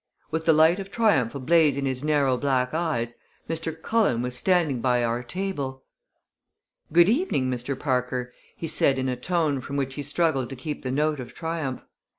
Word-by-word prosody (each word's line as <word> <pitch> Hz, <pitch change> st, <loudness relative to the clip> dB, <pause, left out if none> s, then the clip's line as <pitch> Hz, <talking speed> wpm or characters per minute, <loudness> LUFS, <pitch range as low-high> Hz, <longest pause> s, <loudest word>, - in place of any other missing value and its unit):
With 160 Hz, 0 st, -2 dB
the 165 Hz, -, +6 dB
light 160 Hz, +4 st, +5 dB
of 195 Hz, 0 st, -6 dB
triumph 195 Hz, -, +2 dB
ablaze 150 Hz, +1 st, +3 dB
in 140 Hz, -, -1 dB
his 130 Hz, 0 st, -2 dB
narrow 145 Hz, -4 st, +2 dB
black 130 Hz, -1 st, 0 dB
eyes, 155 Hz, -8 st, -1 dB, 0.3 s
Mr. 165 Hz, 0 st, -3 dB
Cullen 175 Hz, -, +1 dB
was 125 Hz, 0 st, -2 dB
standing 165 Hz, -7 st, +2 dB
by 125 Hz, -1 st, +2 dB
our 120 Hz, +1 st, 0 dB
table! 140 Hz, -3 st, -4 dB, 1.1 s
"Good 170 Hz, +2 st, +6 dB
evening, 220 Hz, -, +1 dB
Mr. 125 Hz, +2 st, -3 dB
Parker!" 125 Hz, -2 st, -1 dB, 0.2 s
he 165 Hz, -, -4 dB
said 135 Hz, -3 st, +2 dB
in 130 Hz, 0 st, -1 dB
a 130 Hz, -, 0 dB
tone 155 Hz, +1 st, 0 dB
from 140 Hz, +2 st, -5 dB
which 135 Hz, -1 st, -1 dB
he 145 Hz, -, -5 dB
struggled 145 Hz, -3 st, 0 dB
to 135 Hz, -, -6 dB
keep 145 Hz, +4 st, -5 dB
the 130 Hz, -, -4 dB
note 150 Hz, +2 st, 0 dB
of 125 Hz, -1 st, -8 dB
triumph. 160 Hz, -6 st, -4 dB
140 Hz, 180 wpm, -25 LUFS, 130-165 Hz, 1.1 s, the